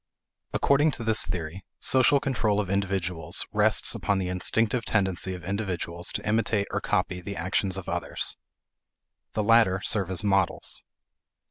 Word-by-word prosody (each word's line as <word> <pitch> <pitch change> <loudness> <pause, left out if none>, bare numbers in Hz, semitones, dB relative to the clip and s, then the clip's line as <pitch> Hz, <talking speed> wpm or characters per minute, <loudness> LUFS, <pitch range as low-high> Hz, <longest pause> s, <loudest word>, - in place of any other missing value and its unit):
According 145 +3 +3
to 120 - -5
this 110 -1 +4
theory, 85 +2 -5 0.2
social 130 +2 +4
control 115 -7 0
of 100 -3 -2
individuals 90 -5 -1
rests - - +3
upon 100 - 0
the 95 -1 -2
instinctive 115 +6 +1
tendency 95 -3 +1
of 90 - -10
individuals 90 -3 -3
to - - -4
imitate 110 -1 +1
or - - -2
copy 90 -1 -1
the 100 +3 -6
actions 95 +2 -1
of - - -7
others. - - -3 1.0
The 105 - 0
latter 110 -4 +4
serve 100 -4 +1
as 95 0 -3
models. 95 -2 0
100 Hz, 145 wpm, -26 LUFS, 90-110 Hz, 1.0 s, this